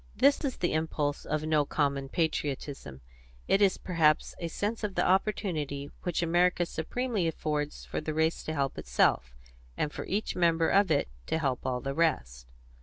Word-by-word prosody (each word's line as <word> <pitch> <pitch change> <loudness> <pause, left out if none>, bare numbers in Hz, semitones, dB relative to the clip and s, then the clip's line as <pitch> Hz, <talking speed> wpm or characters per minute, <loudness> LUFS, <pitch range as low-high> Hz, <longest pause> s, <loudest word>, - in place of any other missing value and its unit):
This 275 +8 +4
is 270 -4 -2
the 175 - 0
impulse 155 -2 -1
of 155 0 -1
no 155 -1 +3
common 140 -2 -1
patriotism; 140 - -2 0.5
it 195 - +3
is 195 -2 +4
perhaps 160 -4 +2
a 170 - -3
sense 210 +7 -3
of 200 -2 -2
the - - +2
opportunity 165 -8 0
which 175 -1 -1
America 175 +1 +3
supremely 205 +4 -2
affords 150 -2 -3
for - - -4
the 155 0 -4
race 160 +1 +1
to 155 - -2
help 140 -2 -1
itself, - - +1 0.4
and 150 - -1
for - - -5
each 205 +3 -2
member 165 -2 +3
of 200 -1 +4
it 145 -3 +2 0.2
to - - 0
help 135 -5 -1
all 125 -1 -1
the 135 0 -3
rest. 60 - 0
160 Hz, 175 wpm, -29 LUFS, 145-180 Hz, 0.5 s, This